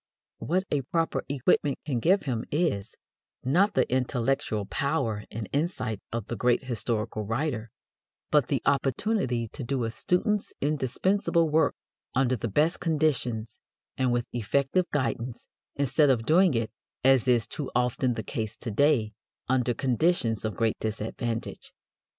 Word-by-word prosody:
What 185 Hz, +4 st, 0 dB
a 145 Hz, -, +2 dB
proper 165 Hz, +5 st, -1 dB
equipment 140 Hz, 0 st, +2 dB
can 135 Hz, -5 st, -1 dB
give 185 Hz, -, +3 dB
him 125 Hz, -6 st, -2 dB
is, 145 Hz, -, -1 dB, 0.5 s
not 180 Hz, +11 st, +3 dB
the 130 Hz, -, +3 dB
intellectual 125 Hz, -4 st, 0 dB
power 135 Hz, -6 st, -1 dB
and 110 Hz, -2 st, -5 dB
insight 140 Hz, -, -1 dB
of 115 Hz, -3 st, -3 dB
the 120 Hz, -, -4 dB
great 125 Hz, +2 st, +2 dB
historical 115 Hz, -3 st, -2 dB
writer, 115 Hz, +1 st, -2 dB, 0.6 s
but -, -, +4 dB
the -, -, -1 dB
opportunity 135 Hz, -, +1 dB
to 135 Hz, -, -7 dB
do 125 Hz, 0 st, -1 dB
a 115 Hz, -, -1 dB
student's 205 Hz, -, 0 dB
indispensable 160 Hz, -, +1 dB
work 160 Hz, +1 st, +3 dB, 0.4 s
under 130 Hz, -1 st, +3 dB
the 115 Hz, -, -3 dB
best 150 Hz, -, +2 dB
conditions 130 Hz, -9 st, 0 dB, 0.4 s
and 130 Hz, -1 st, +1 dB
with 120 Hz, -1 st, 0 dB
effective 140 Hz, -, +1 dB
guidance, 125 Hz, -3 st, -2 dB, 0.3 s
instead 145 Hz, +1 st, +3 dB
of 115 Hz, -4 st, +2 dB
doing 170 Hz, 0 st, +4 dB
it, 115 Hz, -2 st, -1 dB, 0.3 s
as 130 Hz, -2 st, +5 dB
is 120 Hz, -3 st, +4 dB
too 145 Hz, -, -5 dB
often 125 Hz, 0 st, +1 dB
the 110 Hz, -, -4 dB
case 110 Hz, +2 st, -4 dB
to 120 Hz, -, -5 dB
day, 115 Hz, -3 st, +3 dB, 0.3 s
under 125 Hz, -2 st, +1 dB
conditions 130 Hz, -, +1 dB
of 110 Hz, -2 st, -3 dB
great 115 Hz, -1 st, +1 dB
disadvantage. 110 Hz, +1 st, -4 dB
130 Hz, 145 wpm, -27 LUFS, 115-150 Hz, 0.6 s, as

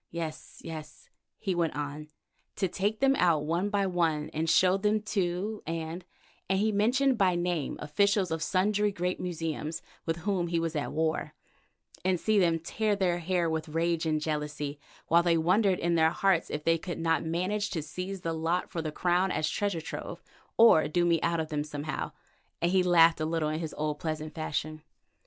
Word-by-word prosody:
"Yes, 160 Hz, -2 st, -6 dB
yes," 155 Hz, -2 st, -9 dB, 0.3 s
he 195 Hz, -4 st, -2 dB
went 170 Hz, -2 st, 0 dB
on, 145 Hz, +1 st, -5 dB, 0.5 s
"to 195 Hz, -, 0 dB
take 205 Hz, +4 st, -2 dB
them 270 Hz, 0 st, +4 dB
out 165 Hz, -4 st, +3 dB
one 170 Hz, +6 st, 0 dB
by 200 Hz, -1 st, +1 dB
one 165 Hz, -5 st, 0 dB
and 160 Hz, +1 st, -1 dB
show 185 Hz, +2 st, +5 dB
them 210 Hz, +2 st, +1 dB
to 200 Hz, +1 st, -2 dB
—— -, -, -27 dB
and 165 Hz, +2 st, -4 dB, 0.2 s
——," -, -, -33 dB
and 190 Hz, -, +2 dB
he 215 Hz, +2 st, +2 dB
mentioned 245 Hz, +5 st, +2 dB
by 185 Hz, -3 st, +4 dB
name 175 Hz, -4 st, -1 dB
officials 195 Hz, +4 st, +1 dB
of 160 Hz, -1 st, -2 dB
sundry 205 Hz, +4 st, +1 dB
great 180 Hz, -1 st, -2 dB
museums 165 Hz, -2 st, -4 dB, 0.2 s
with 165 Hz, -, +1 dB
whom 190 Hz, -4 st, 0 dB
he 170 Hz, 0 st, 0 dB
was 165 Hz, -1 st, -2 dB
at 145 Hz, -, -2 dB
war, 160 Hz, 0 st, -1 dB, 0.7 s
"and 185 Hz, -1 st, +1 dB
see 215 Hz, +2 st, +2 dB
them 170 Hz, -3 st, +3 dB
tear 210 Hz, +6 st, -1 dB
their 180 Hz, -3 st, +1 dB
hair 175 Hz, 0 st, 0 dB
with 160 Hz, -1 st, -2 dB
rage 165 Hz, +1 st, 0 dB
and 155 Hz, -1 st, +1 dB
jealousy, 150 Hz, -1 st, -3 dB, 0.3 s
while 170 Hz, +1 st, +5 dB
they 170 Hz, -1 st, +2 dB
wondered 185 Hz, +4 st, +3 dB
in 170 Hz, 0 st, 0 dB
their 160 Hz, -1 st, +4 dB
hearts 180 Hz, 0 st, +1 dB
if 150 Hz, -, -4 dB
they 165 Hz, +1 st, +2 dB
could 175 Hz, +1 st, -5 dB
not 165 Hz, -2 st, +1 dB
manage 185 Hz, +6 st, -1 dB
to 160 Hz, -4 st, -3 dB
seize 180 Hz, +5 st, -5 dB
the 165 Hz, -1 st, -2 dB
lot 165 Hz, +3 st, -1 dB
for 165 Hz, -, -2 dB
the 155 Hz, -1 st, -3 dB
Crown 180 Hz, +4 st, +1 dB
as 155 Hz, 0 st, 0 dB
treasure 195 Hz, 0 st, -1 dB
trove, -, -, -7 dB, 0.3 s
or 160 Hz, -10 st, +7 dB
do 175 Hz, +3 st, +1 dB
me 170 Hz, -2 st, +2 dB
out 170 Hz, 0 st, +1 dB
of 160 Hz, -1 st, -3 dB
them 150 Hz, -1 st, -1 dB
somehow," 150 Hz, 0 st, -4 dB, 0.5 s
and 170 Hz, +1 st, +1 dB
he 190 Hz, 0 st, +4 dB
laughed 170 Hz, -2 st, +5 dB
a -, -, +1 dB
little 160 Hz, -1 st, 0 dB
in 155 Hz, +1 st, -2 dB
his 160 Hz, -2 st, -5 dB
old, 150 Hz, -1 st, -2 dB
pleasant 155 Hz, -1 st, -4 dB
fashion. 155 Hz, -1 st, -3 dB
170 Hz, 195 wpm, -29 LUFS, 160-190 Hz, 0.7 s, or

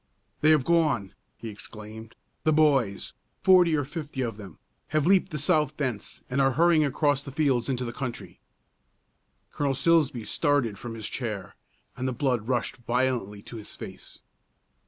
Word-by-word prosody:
"They 155 Hz, -, +4 dB
have 150 Hz, -5 st, +4 dB
gone!" 150 Hz, -, +2 dB, 0.2 s
he 115 Hz, -, -8 dB
exclaimed. 110 Hz, +1 st, -10 dB, 0.3 s
"The 155 Hz, -, +3 dB
boys 140 Hz, -10 st, +2 dB, 0.3 s
forty 180 Hz, -4 st, +6 dB
or 145 Hz, -2 st, 0 dB
fifty 150 Hz, -2 st, -5 dB
of 115 Hz, -4 st, -3 dB
them 100 Hz, -5 st, -11 dB, 0.3 s
have 155 Hz, -1 st, +1 dB
leaped 190 Hz, 0 st, +4 dB
the 155 Hz, -, -3 dB
south 150 Hz, 0 st, +1 dB
fence, 130 Hz, -8 st, -4 dB
and 135 Hz, +2 st, 0 dB
are 135 Hz, -1 st, +3 dB
hurrying 165 Hz, +2 st, +4 dB
across 145 Hz, 0 st, +1 dB
the 140 Hz, -, -9 dB
fields 135 Hz, -4 st, +1 dB
into 125 Hz, -1 st, -1 dB
the 120 Hz, -, -5 dB
country!" 125 Hz, -2 st, -6 dB, 1.1 s
Colonel 140 Hz, -2 st, 0 dB
Silsbee 150 Hz, -7 st, +2 dB
started 130 Hz, -, +1 dB
from 120 Hz, -1 st, -6 dB
his 110 Hz, -2 st, -4 dB
chair, 105 Hz, -7 st, -4 dB, 0.4 s
and 130 Hz, +1 st, -3 dB
the 130 Hz, -, -1 dB
blood 125 Hz, -4 st, 0 dB
rushed 125 Hz, -3 st, -1 dB
violently 120 Hz, -4 st, -1 dB
to 120 Hz, -, -9 dB
his 105 Hz, -, -9 dB
face. -, -, -10 dB
130 Hz, 160 wpm, -27 LUFS, 115-150 Hz, 1.1 s, forty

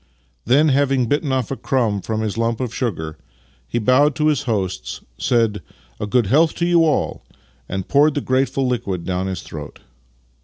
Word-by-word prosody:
Then, 145 Hz, +7 st, +4 dB
having 135 Hz, -2 st, +2 dB
bitten 145 Hz, +3 st, 0 dB
off 130 Hz, -3 st, -1 dB
a -, -, -1 dB
crumb 115 Hz, -8 st, 0 dB
from 110 Hz, +1 st, -2 dB
his 110 Hz, -2 st, -2 dB
lump 115 Hz, 0 st, 0 dB
of 125 Hz, -3 st, -3 dB
sugar, 80 Hz, -, -3 dB, 0.5 s
he -, -, -2 dB
bowed 130 Hz, +6 st, +3 dB
to 155 Hz, 0 st, +2 dB
his 150 Hz, -, +1 dB
hosts, 95 Hz, -, -2 dB, 0.2 s
said 115 Hz, -4 st, +1 dB, 0.2 s
" -, -, -32 dB
A 105 Hz, -, -3 dB
good 120 Hz, +2 st, +2 dB
health 155 Hz, -, +3 dB
to 170 Hz, -, 0 dB
you 170 Hz, -1 st, +4 dB
all! 155 Hz, -2 st, 0 dB, 0.2 s
" -, -, -36 dB
and 95 Hz, -1 st, -3 dB
poured 145 Hz, +1 st, +4 dB
the 145 Hz, -, 0 dB
grateful 135 Hz, +1 st, 0 dB
liquid 100 Hz, -8 st, -2 dB
down 95 Hz, 0 st, -1 dB
his 95 Hz, -2 st, -4 dB
throat. 75 Hz, -2 st, -8 dB
120 Hz, 190 wpm, -20 LUFS, 100-140 Hz, 0.5 s, Then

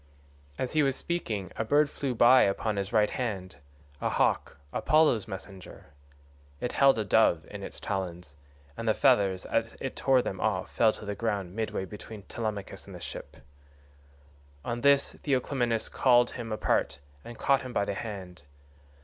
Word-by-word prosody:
As 130 Hz, -, -2 dB
he 155 Hz, -, +4 dB
was 135 Hz, -2 st, +2 dB
speaking 110 Hz, -, -3 dB
a -, -, 0 dB
bird 145 Hz, +6 st, +3 dB
flew 135 Hz, -3 st, -3 dB
by 125 Hz, +3 st, +7 dB
upon 105 Hz, +2 st, +1 dB
his 100 Hz, 0 st, -2 dB
right 105 Hz, -2 st, +3 dB
hand—a 75 Hz, -, -5 dB
hawk, -, -, 0 dB, 0.2 s
Apollo's 155 Hz, -9 st, +3 dB
messenger. 95 Hz, -7 st, -10 dB, 0.7 s
It 125 Hz, -, -2 dB
held 135 Hz, -3 st, +5 dB
a 110 Hz, -, -1 dB
dove 90 Hz, -6 st, +3 dB
in -, -, -7 dB
its -, -, -8 dB
talons, 90 Hz, -6 st, -4 dB, 0.4 s
and 115 Hz, -, -5 dB
the 110 Hz, -, +3 dB
feathers, 95 Hz, -2 st, +3 dB
as -, -, -1 dB
it -, -, -4 dB
tore 130 Hz, -2 st, +3 dB
them 95 Hz, -, -4 dB
off,138 100 Hz, -4 st, 0 dB
fell 110 Hz, -2 st, +5 dB
to -, -, -10 dB
the 105 Hz, -, -3 dB
ground 100 Hz, -4 st, -3 dB
midway 110 Hz, -4 st, -2 dB
between 105 Hz, +1 st, -10 dB
Telemachus 105 Hz, -2 st, -5 dB
and -, -, -9 dB
the -, -, -8 dB
ship. -, -, -8 dB, 1.3 s
On 120 Hz, 0 st, -3 dB
this 140 Hz, +1 st, +4 dB
Theoclymenus 125 Hz, -4 st, 0 dB
called 120 Hz, -2 st, +4 dB
him 115 Hz, -2 st, -6 dB
apart 110 Hz, -8 st, 0 dB, 0.3 s
and 120 Hz, -1 st, -10 dB
caught 140 Hz, -1 st, +2 dB
him 130 Hz, -, -7 dB
by 100 Hz, -4 st, 0 dB
the 100 Hz, -, -2 dB
hand. 95 Hz, -6 st, -7 dB
110 Hz, 165 wpm, -28 LUFS, 95-125 Hz, 1.3 s, by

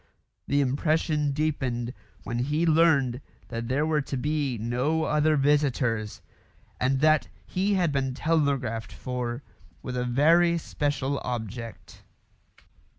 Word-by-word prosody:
The 145 Hz, +1 st, +2 dB
impression 150 Hz, +2 st, +1 dB
deepened 135 Hz, -5 st, -1 dB, 0.3 s
when 120 Hz, +1 st, -3 dB
he 150 Hz, +6 st, 0 dB
learned 155 Hz, -6 st, +3 dB, 0.3 s
that 115 Hz, -1 st, -4 dB
there 140 Hz, +5 st, +1 dB
were 155 Hz, -1 st, +1 dB
to 135 Hz, -1 st, -4 dB
be 145 Hz, -2 st, -1 dB
no 125 Hz, +8 st, 0 dB
other 150 Hz, 0 st, +2 dB
visitors, 135 Hz, -6 st, +1 dB, 0.6 s
and 130 Hz, +1 st, +1 dB
that 155 Hz, -1 st, +4 dB, 0.2 s
he 195 Hz, +2 st, 0 dB
had 175 Hz, -5 st, +2 dB
been 135 Hz, -2 st, -1 dB
telegraphed 140 Hz, -8 st, 0 dB
for 125 Hz, 0 st, -4 dB, 0.4 s
with 125 Hz, -, -4 dB
a 125 Hz, -, 0 dB
very 165 Hz, +7 st, +4 dB
special 145 Hz, -3 st, -2 dB
object. 115 Hz, -1 st, -6 dB
140 Hz, 120 wpm, -27 LUFS, 125-155 Hz, 0.6 s, that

